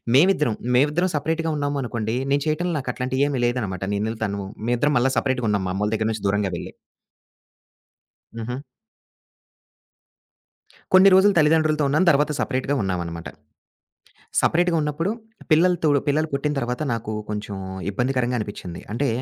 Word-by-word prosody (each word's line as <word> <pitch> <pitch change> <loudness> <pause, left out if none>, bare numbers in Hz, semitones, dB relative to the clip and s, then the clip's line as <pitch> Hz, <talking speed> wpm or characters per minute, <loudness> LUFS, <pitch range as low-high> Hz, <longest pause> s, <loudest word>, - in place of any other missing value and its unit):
మేమిద్దరం 150 - +4 0.2
మేమిద్దరం 150 +8 +2
సెపరేట్‌గా 160 +2 -1
ఉన్నాము 145 0 -1
అనుకోండి. 115 -2 -3 0.2
నేను 145 - +2
చేయటంలో 170 +3 0
నాకట్లాంటివి 130 +1 -1
ఏమి 135 -4 -1
లేదనమాట 105 -7 -2
నేనూతను. 105 -2 -3 0.2
మేమిద్దరం 120 +5 +1
మళ్ళా 130 +2 +2
సపరేట్‌గా 125 -4 0
ఉన్నాం. 100 -2 0
మామ్మళ 100 +3 -1
దగ్గర 110 +1 0
నుంచి 110 -2 -5
దూరంగా 100 -1 0
వెళ్లి. - - -8 1.6
హుహు. 115 +2 -4 2.4
కొన్ని 190 +1 +8
రోజులు 200 +1 +5
తల్లిదండ్రులతో 155 -1 +3
ఉన్నాను. 155 +6 +2
తర్వాత 150 +1 +2
సపరేట్‌గా 130 +2 -1
ఉన్నామనమాట. 85 -3 -3 1.1
సపరేట్‌గా 175 +1 +2
ఉన్నప్పుడు 150 +6 -1 0.4
పిల్లలతో 170 +1 +4 0.2
పిల్లలు 155 +2 +1
పుట్టిన 145 +2 0
తర్వాత 125 +3 -2
నాకు 115 -1 -3 0.2
కొంచెం 105 -1 -4 0.4
ఇబ్బందికరంగా 125 +2 0
అనిపించింది. 95 -5 -6
అంటే 140 +3 0
130 Hz, 120 wpm, -23 LUFS, 110-155 Hz, 2.4 s, కొన్ని